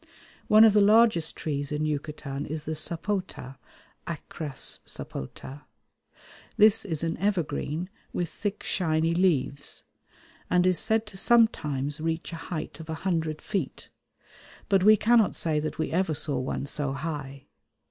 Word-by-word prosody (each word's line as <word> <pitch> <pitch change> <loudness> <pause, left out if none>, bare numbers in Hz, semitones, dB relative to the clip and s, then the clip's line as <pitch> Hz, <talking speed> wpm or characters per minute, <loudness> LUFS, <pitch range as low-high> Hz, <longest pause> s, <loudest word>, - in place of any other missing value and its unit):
One 215 +1 +7
of 220 -2 +7
the 210 - +5
largest 210 -6 +4
trees 145 -2 -3
in 150 +1 -1
Yucatan 145 -1 -4
is 155 0 -5
the 155 - -3
sapota 165 -4 -2 0.5
(Achras 155 -3 -3
sapota). 130 - -7 1.0
This 215 +1 +5
is 160 -5 -3
an 165 - -1
evergreen 175 -3 -1 0.2
with 175 - -2
thick 205 +5 -4
shiny 165 -2 +1
leaves, 155 -6 0 0.7
and 180 0 +3
is 185 -1 +3
said 220 0 +2
to 210 -3 -9
sometimes 150 - +2
reach 165 +1 -2
a 165 - -8
height 160 -1 -5
of 160 0 -10
a 160 - -2
hundred 160 -4 -1
feet, 195 -10 -4 0.8
but 195 -2 +3
we 215 +1 +7
cannot 225 0 +3
say 155 -2 0
that 155 +1 -4
we 160 - -2
ever 170 -2 0
saw 140 -3 0
one 130 +1 -3
so 140 -1 -2
high. 140 -2 -6
160 Hz, 145 wpm, -27 LUFS, 150-195 Hz, 1.0 s, One